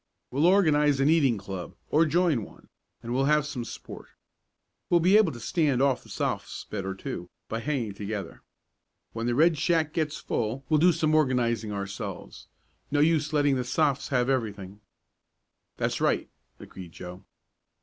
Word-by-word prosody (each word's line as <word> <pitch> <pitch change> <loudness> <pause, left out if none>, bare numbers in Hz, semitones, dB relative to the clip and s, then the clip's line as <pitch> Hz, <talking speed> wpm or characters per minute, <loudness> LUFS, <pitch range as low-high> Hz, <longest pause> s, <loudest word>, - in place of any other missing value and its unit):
"We'll 145 +6 +3
organize 150 -7 +4
an 140 +3 +4
eating 140 -8 +3
club, 95 -3 -7 0.2
or 160 +2 +4
join 160 - +2
one, - - -15 0.3
and 120 +1 -4
we'll 135 +2 +2
have 150 0 +3
some 135 -5 -4
sport. 115 - -9 0.8
We'll 175 - +5
be 180 +4 +4
able 210 -6 +5
to 120 - -9
stand 150 - +1
off 135 -2 +2
the - - -18
Sophs. - - -3
better, 95 -2 -4
too, 90 -2 -6 0.2
by 115 - -3
hanging 120 -5 -2
together. 100 -3 -6 0.7
When 115 +1 -3
the 120 - +1
Red 160 +2 +4
Shack 160 -1 +1
gets 155 -1 -1
full 120 +5 -3
we'll 155 -2 +4
do 180 +3 +6
some 155 -2 0
organizing 120 -7 +1
ourselves. 100 0 -6 0.4
No 145 - +1
use 155 0 +2
letting 145 -3 +2
the 125 - -1
Sophs. 140 +2 0
have 125 -2 +1
everything." 105 -6 -3 1.0
"That's - - -1
right," - - +1 0.3
agreed 90 -3 -11
Joe. 90 +2 -9
135 Hz, 160 wpm, -27 LUFS, 110-155 Hz, 1.0 s, do